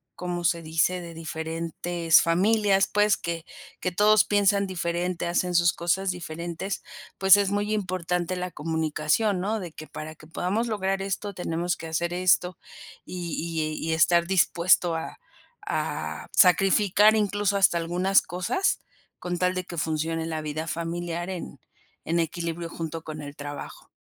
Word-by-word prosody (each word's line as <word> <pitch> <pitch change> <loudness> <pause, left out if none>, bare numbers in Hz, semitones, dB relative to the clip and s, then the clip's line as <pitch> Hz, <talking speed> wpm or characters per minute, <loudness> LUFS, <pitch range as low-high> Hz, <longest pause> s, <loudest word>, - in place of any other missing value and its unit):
¿como 175 -1 -4
se 170 0 +2
dice? 165 +3 +1
De 170 -1 -9
diferentes 165 +1 0
familias, 195 +3 +3
pues, 210 0 +3
que 170 -1 -4 0.3
que 180 - -2
todos 210 +4 +5
piensan 200 -1 +3
diferente, 175 -1 -2
hacen 175 +1 0
sus 170 0 +4
cosas 185 +3 0
diferentes, 170 +2 -4 0.4
pues, 190 +1 +7
es 200 -1 +1
muy 205 +1 -1
importante 180 -2 -1
la 180 0 -3
comunicación, 160 +5 0
¿no?, 215 +3 -1
de 175 -4 -7
que, 155 - -10
para 155 +1 -8
que 155 - -16
podamos 190 +8 -1
lograr 195 -3 -1
esto 200 +1 -3
tenemos 175 0 -2
que 165 - -7
hacer 170 +2 -1
esto 180 -1 +2 0.5
y 175 -3 -5 0.4
y 160 - -4
y 160 - +2
estar 170 +2 +4
dispuesto 175 -2 +3
a 160 - -6 0.5
a - - -3
sacrificar 195 +3 +5
incluso 205 -1 +1
hasta 190 -3 +4
algunas 180 +4 +2
cosas, 185 - -1 0.4
con 175 -1 -4
tal 180 +1 +1
de 185 - -2
que 175 -1 -9
funcione 160 +1 -1
la 160 -1 -3
vida 155 +2 -4
familiar 170 +2 -3
en 180 - -7 0.5
en 170 +1 0
equilibrio 170 +1 -3
junto 165 -1 -5
con 155 -1 -7
el 145 0 -8
trabajo. 145 0 -8
175 Hz, 150 wpm, -26 LUFS, 165-190 Hz, 0.5 s, pues